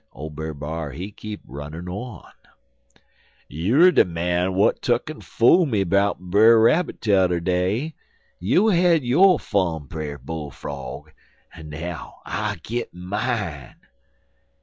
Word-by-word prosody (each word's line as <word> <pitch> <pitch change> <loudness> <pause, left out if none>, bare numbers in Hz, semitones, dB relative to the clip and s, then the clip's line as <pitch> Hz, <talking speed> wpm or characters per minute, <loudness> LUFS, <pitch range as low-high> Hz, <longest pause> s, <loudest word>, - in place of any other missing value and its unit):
Ole 75 +2 -7
Brer 80 +1 -6
B'ar 75 0 -5
he 90 +8 -6
keep 105 0 -8
runnin' 75 +6 -8
on: 100 +2 -7 1.2
"'You 100 - +2
er 185 - +8
de - - +5
man 90 +1 -1
w'at 95 +2 +1
tuck 120 +5 0
en 155 - -11
fool 165 +9 +4
me 105 -7 +1
'bout 100 +2 +1
Brer 105 +6 +5
Rabbit 155 +10 +2
t'er 95 -5 +2
day. 95 - -1 0.5
You 180 - +3
had 175 -5 +3
yo' 175 +9 +5
fun, 85 - -1
Brer 75 0 -6
Bull 80 -1 -6
frog, 70 -1 -8 0.4
en 80 -1 -11
now 80 +3 -7
I'll 105 -1 -2
git 120 +2 -4
mine.' 90 - -4
95 Hz, 135 wpm, -23 LUFS, 80-115 Hz, 1.2 s, er